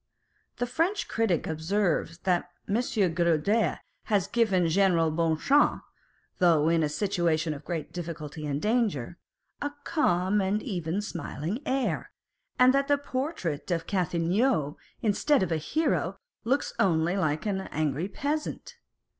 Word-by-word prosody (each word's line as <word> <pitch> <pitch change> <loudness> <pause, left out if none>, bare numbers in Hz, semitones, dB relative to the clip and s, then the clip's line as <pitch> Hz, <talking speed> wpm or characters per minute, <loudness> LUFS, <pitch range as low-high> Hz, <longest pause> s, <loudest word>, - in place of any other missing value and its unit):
The 245 - 0
French 330 - 0
critic 220 -8 0
observes 165 +1 0
that 180 -1 +1 0.2
M. 200 - 0 0.4
Girodet 170 +6 +1 0.2
has 205 -5 +2
given 200 -7 +2
General 170 -2 +3
Bonchamps, 165 - +2 0.6
though 165 -3 +4
in 165 -1 +3
a 150 - +1
situation 170 -3 0
of 145 0 -9
great 165 -1 -4
difficulty 160 -3 -6
and 140 -1 -1
danger, 205 - 0 0.4
a 290 - -2
calm 190 - +1
and 195 +3 0
even 180 - -2
smiling 170 - -4
air, 265 0 -1 0.5
and 255 +1 +6
that 275 0 +2
the 285 - +3
portrait 260 - -3
of 170 -2 -1
Cathelineau, 175 - +1 0.3
instead 225 +4 +3
of 180 - -2
a 160 - +2
hero, 310 - 0 0.3
looks 265 +5 0
only 170 -1 +2
like 155 -4 0
an 195 -2 -1
angry 155 +2 -1
peasant. 295 +8 -4
180 Hz, 130 wpm, -28 LUFS, 160-225 Hz, 0.6 s, and